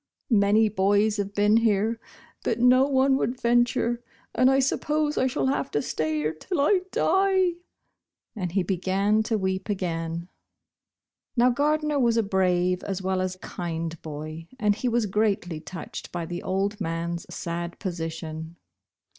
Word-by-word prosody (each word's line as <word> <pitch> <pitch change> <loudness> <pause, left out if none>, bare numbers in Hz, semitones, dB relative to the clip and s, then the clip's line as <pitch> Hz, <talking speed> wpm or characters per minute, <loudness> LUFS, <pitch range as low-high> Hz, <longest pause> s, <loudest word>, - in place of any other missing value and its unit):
Many 210 +1 +4
bo\3 205 +1 +2
have 200 0 -3
been 210 +2 +4
here, 225 0 +2 0.4
but 225 - 0
no 255 +2 +5
one 265 -1 +3
would 250 0 -2
venture, 240 0 +2 0.3
and 255 +2 +4
I 270 - +4
suppose 295 +3 +1
I 260 - +2
shall 260 - -1
have 265 0 0
to 145 - 0
stay 155 +2 -1
here 155 +1 -1
till 345 - -4
I 365 +7 +4
die," 375 -1 +2 0.8
and 180 -5 -3
he 195 -1 +2
b^ran 195 +4 +1
to 220 0 0
weep 190 0 -2
again. 170 -3 -2 1.1
Xow 245 +1 +5
Gardner 300 +2 +1
was 235 -3 +3
a 225 - +3
brave 180 -2 +1
as 195 -1 -4
well 190 0 0
as 185 0 -2
kind 165 -1 -4
bov, 155 +1 -7
and 210 -2 +3
he 245 +4 -2
was 235 -1 +1
greatly 195 -5 0
touched 170 +2 -8
by 175 -1 -3
the 175 +1 -5
old 200 +3 -1
man 165 -1 -2
s - - -14
sad 170 0 -4
position. 165 -2 -5
200 Hz, 155 wpm, -26 LUFS, 175-240 Hz, 1.1 s, no